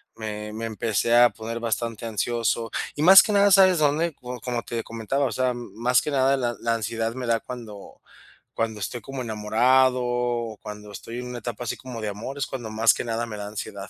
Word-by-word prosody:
me 105 Hz, -1 st, -6 dB
me 115 Hz, +1 st, -4 dB
empecé 115 Hz, +1 st, 0 dB
a 120 Hz, 0 st, +7 dB
poner 115 Hz, +2 st, -6 dB
bastante 115 Hz, 0 st, -3 dB
ansioso, 115 Hz, +1 st, -1 dB, 0.2 s
y 150 Hz, -, -1 dB
más 190 Hz, +3 st, +10 dB
que 215 Hz, -, -2 dB
nada, 200 Hz, 0 st, +4 dB
¿sabes 190 Hz, -2 st, +6 dB
dónde?, 155 Hz, +3 st, +2 dB
co 125 Hz, -1 st, -8 dB
como 120 Hz, -2 st, -3 dB
te 115 Hz, -1 st, -4 dB
comentaba, 115 Hz, +5 st, -2 dB
o 125 Hz, -, -1 dB
sea, 130 Hz, +2 st, +1 dB
m 120 Hz, -1 st, -7 dB
más 120 Hz, +2 st, +3 dB
que -, -, -4 dB
nada 135 Hz, 0 st, +3 dB
la 120 Hz, -2 st, -1 dB
la 115 Hz, 0 st, 0 dB
ansiedad 115 Hz, +1 st, -2 dB
me 125 Hz, -1 st, -5 dB
da 115 Hz, -1 st, +2 dB
cuando 110 Hz, -5 st, -10 dB, 0.5 s
cuando 110 Hz, -2 st, -2 dB
estoy 115 Hz, +5 st, -4 dB
como 135 Hz, +3 st, -6 dB
enamorado 125 Hz, +4 st, +2 dB
o 120 Hz, -2 st, -1 dB
cuando 105 Hz, -1 st, -9 dB
estoy 115 Hz, +4 st, -7 dB
en 125 Hz, -, -6 dB
una 125 Hz, -1 st, -6 dB
etapa 120 Hz, 0 st, -5 dB
así 115 Hz, -, -3 dB
como 125 Hz, -3 st, -8 dB
de 110 Hz, -, -3 dB
amor, 115 Hz, +7 st, -6 dB
es -, -, -1 dB
cuando 120 Hz, -5 st, -6 dB
más 110 Hz, +1 st, +4 dB
que -, -, -4 dB
nada 115 Hz, 0 st, -2 dB
me 105 Hz, -2 st, -7 dB
da 105 Hz, -, -5 dB
ansiedad. 100 Hz, -1 st, -7 dB
115 Hz, 220 wpm, -25 LUFS, 110-125 Hz, 0.5 s, más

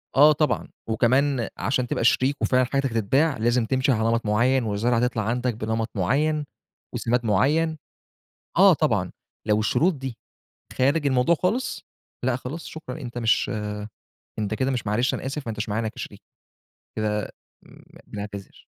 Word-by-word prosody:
آه 145 Hz, +3 st, +8 dB
طبعًا. 150 Hz, 0 st, 0 dB, 0.2 s
وكمان 125 Hz, +3 st, +2 dB
عشان 125 Hz, +6 st, 0 dB
تبقى -, -, -1 dB
شريك، 130 Hz, +4 st, +3 dB
وفعلًا 130 Hz, 0 st, +3 dB
حاجتك 135 Hz, +1 st, 0 dB
تتباع، 130 Hz, +7 st, +2 dB
لازم 120 Hz, +1 st, +2 dB
تمشي 130 Hz, +4 st, +1 dB
على 110 Hz, -3 st, +1 dB
نمط 115 Hz, 0 st, 0 dB
معيّن، 120 Hz, +5 st, +2 dB
والزرعة 115 Hz, +3 st, +1 dB
تطلع 115 Hz, -3 st, -2 dB
عندك 120 Hz, +3 st, 0 dB
بنمط 110 Hz, +1 st, -2 dB
معيّن، 145 Hz, -, +1 dB, 0.5 s
وسِماد 120 Hz, +1 st, 0 dB
معيّن. 150 Hz, +10 st, +2 dB, 0.8 s
آه -, -, +8 dB
طبعًا، -, -, 0 dB, 0.4 s
لو 105 Hz, -1 st, +3 dB
الشروط 165 Hz, -, +2 dB
دي 135 Hz, -4 st, -6 dB, 0.6 s
خارج 145 Hz, +4 st, +2 dB
الموضوع 130 Hz, +4 st, +3 dB
خالص، 215 Hz, -, -1 dB, 0.4 s
لأ 125 Hz, -1 st, +1 dB
خلاص 135 Hz, +6 st, -7 dB
شكرًا، 160 Hz, 0 st, -8 dB
أنت 120 Hz, -3 st, -6 dB
مش 115 Hz, +3 st, +2 dB, 0.9 s
أنت 105 Hz, 0 st, -1 dB
كده 130 Hz, +5 st, 0 dB
مش 125 Hz, -5 st, -2 dB
معلش 115 Hz, +5 st, +1 dB
أنا -, -, -5 dB
آسف، 145 Hz, +2 st, -3 dB
ما -, -, -2 dB
أنتاش 105 Hz, 0 st, -4 dB
معانا 110 Hz, +2 st, -1 dB
كشريك، -, -, -9 dB, 0.8 s
كده 105 Hz, -1 st, -1 dB, 0.4 s
إمم، -, -, -17 dB, 0.2 s
بنعتذر. 100 Hz, -1 st, -8 dB
125 Hz, 150 wpm, -24 LUFS, 110-140 Hz, 0.9 s, آه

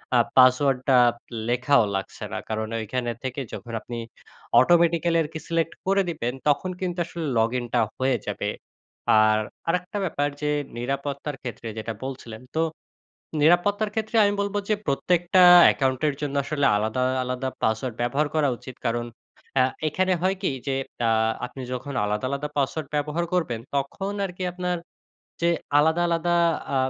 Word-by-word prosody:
আ -, -, +6 dB, 0.2 s
পাসওয়ার্ডটা 130 Hz, 0 st, +5 dB, 0.5 s
লেখাও 125 Hz, +1 st, +3 dB
লাগছে 95 Hz, -, -5 dB
না। -, -, -2 dB
কারণ 110 Hz, 0 st, -2 dB
ঐখানে 120 Hz, +2 st, -2 dB
থেকে 130 Hz, +1 st, -3 dB
যখন 120 Hz, -, -7 dB
আপনি 120 Hz, -, -7 dB, 0.6 s
automatically 170 Hz, +3 st, +4 dB
আরকি 160 Hz, +1 st, -6 dB
সিলেক্ট 165 Hz, -1 st, 0 dB
করে 195 Hz, +1 st, +4 dB
দিবেন, 125 Hz, -7 st, -2 dB, 0.2 s
তখন 180 Hz, +6 st, +1 dB
কিন্তু 180 Hz, -1 st, -2 dB
আসলে 170 Hz, -1 st, -5 dB
লগইনটা 120 Hz, +1 st, 0 dB, 0.2 s
হয়ে 130 Hz, -1 st, +2 dB
যাবে। -, -, -2 dB, 0.7 s
আর 110 Hz, 0 st, +4 dB, 0.3 s
আরেকটা 180 Hz, +4 st, -1 dB
ব্যাপার 145 Hz, -4 st, 0 dB
যে 150 Hz, -, 0 dB, 0.3 s
নিরাপত্তার 140 Hz, +3 st, -3 dB
ক্ষেত্রে 120 Hz, -2 st, -6 dB
যেটা 110 Hz, +1 st, -4 dB
বলছিলেন, 125 Hz, -4 st, -7 dB
তো 160 Hz, -, +2 dB, 0.8 s
নিরাপত্তার 190 Hz, +7 st, +3 dB
ক্ষেত্রে 220 Hz, +1 st, -2 dB
আমি 205 Hz, -, +2 dB
বলব 200 Hz, 0 st, -3 dB
যে 215 Hz, -, +4 dB
প্রত্যেকটা 175 Hz, +6 st, +2 dB, 0.2 s
অ্যাকাউন্টের 135 Hz, +2 st, +2 dB
জন্য 145 Hz, -1 st, -3 dB
আসলে 140 Hz, -1 st, 0 dB
আলাদা, 110 Hz, +4 st, 0 dB, 0.2 s
আলাদা 125 Hz, +1 st, -3 dB, 0.2 s
পাসওয়ার্ড 110 Hz, +2 st, 0 dB
ব্যবহার 135 Hz, +5 st, +1 dB
করা 150 Hz, -3 st, +3 dB
উচিত। 130 Hz, 0 st, -10 dB
কারণ 120 Hz, +1 st, 0 dB, 0.5 s
অ্যা 130 Hz, -1 st, +5 dB, 0.2 s
এখানে 185 Hz, +4 st, +1 dB
হয় 190 Hz, +1 st, +2 dB
কি -, -, +2 dB, 0.2 s
যে 135 Hz, -, +1 dB, 0.3 s
আ -, -, +3 dB, 0.4 s
আপনি 130 Hz, +2 st, -9 dB
যখন 130 Hz, +3 st, -5 dB
আলাদা, 105 Hz, +3 st, -1 dB
আলাদা 140 Hz, +2 st, -3 dB
পাসওয়ার্ড 140 Hz, +2 st, -1 dB
ব্যবহার 150 Hz, +3 st, -1 dB
করবেন, 155 Hz, -11 st, 0 dB, 0.2 s
তখন 165 Hz, +9 st, -2 dB
আর 190 Hz, -, -5 dB
কি 185 Hz, -, -4 dB
আপনার 180 Hz, 0 st, -2 dB, 0.7 s
যে 170 Hz, -, +4 dB, 0.3 s
আলাদা, 160 Hz, +3 st, +3 dB
আলাদা 170 Hz, +1 st, +1 dB, 0.4 s
আ -, -, +2 dB
140 Hz, 150 wpm, -25 LUFS, 125-170 Hz, 0.8 s, আ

